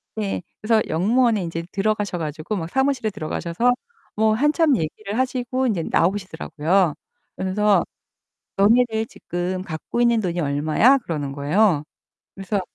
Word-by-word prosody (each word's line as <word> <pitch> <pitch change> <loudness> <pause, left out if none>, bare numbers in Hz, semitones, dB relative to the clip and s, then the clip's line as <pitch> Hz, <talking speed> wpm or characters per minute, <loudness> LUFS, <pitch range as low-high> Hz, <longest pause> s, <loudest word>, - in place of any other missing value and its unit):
네. 205 -4 -2 0.2
그래서 215 0 +3
역무원에 215 +5 +2
이제 165 -1 -4
들어가셔 205 -2 -1
가지고 155 +5 -4
막 165 -4 -4
사무실에 265 -1 +1
들어가셔서 190 +5 -1 0.4
뭐 220 0 +3
한참 295 +4 +3
얘기를 200 +7 -4
하시고 255 0 0
이제 190 -8 0
나오시더라고요. 175 -2 +1 0.4
그러면서 200 +2 +2 0.7
"너네들 220 +2 +3
지금 180 -1 -4
갖고 165 +7 -4
있는 235 -2 +4
돈이 175 -3 -2
얼마야?" 155 - +3
그러는 150 - -4
거예요. 150 +3 +2 0.5
그래서 195 +1 -2
200 Hz, 340 characters per minute, -22 LUFS, 170-230 Hz, 0.7 s, 있는